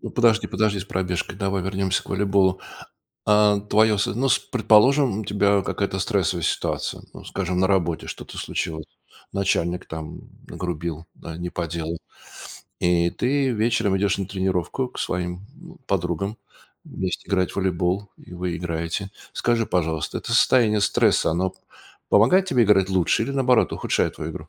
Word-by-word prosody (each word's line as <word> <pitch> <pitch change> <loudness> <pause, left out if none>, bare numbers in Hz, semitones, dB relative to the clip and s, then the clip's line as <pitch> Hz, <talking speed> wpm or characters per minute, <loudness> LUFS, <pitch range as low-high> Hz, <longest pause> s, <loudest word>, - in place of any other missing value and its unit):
Подожди 115 -2 +3
подожди 105 -2 0
с 90 - -6
пробежкой, 90 -2 -2
давай 95 -2 -1
вернемся 95 0 -1
к - - -16
волейболу. 95 -1 +2 0.6
А, 105 -1 +4
твоё 105 +1 +3
с 100 - +1
ну 130 +7 0
с - - +4
предположим, 120 +1 +3
у - - -6
тебя 100 0 +2
какая-то - - -2
стрессовая - - 0
ситуация, - - -2
ну, - - -12
скажем, 90 -2 -3
на 95 - +4
работе 85 -4 0
что-то - - -8
случилось, 80 -1 -3 0.5
начальник 90 -2 0
там 80 -1 -7 0.3
нагрубил, 85 -2 -4
да, 80 -1 -9
не 90 0 -5
по 85 -1 -3
делу, 85 0 -4 0.8
и 85 -1 +2
ты 135 +5 0
вечером 115 -3 +1
идешь 100 0 +1
на 95 - -2
тренировку 95 +5 -1
к - - -12
своим 90 +1 -3 0.4
подругам 95 +3 -1 0.5
вместе 95 -1 -4
играть 95 -2 +1
в - - -12
волейбол, 95 +1 -1
и - - -15
вы 90 -1 -3
играете. 85 +3 -3 0.2
Скажи, 120 -1 +1
пожалуйста, 80 -3 -1
это - - -5
состояние 115 -3 +4
стресса, 100 - +3
оно 90 +3 0 0.6
помогает 180 - +5
тебе 125 -9 +3
играть 95 -2 +4
лучше 95 +3 +2
или, 140 - -4
наоборот, 130 -3 +3
ухудшает - - -1
твою 80 +1 -5
игру? 75 0 -9
95 Hz, 155 wpm, -23 LUFS, 90-105 Hz, 0.8 s, помогает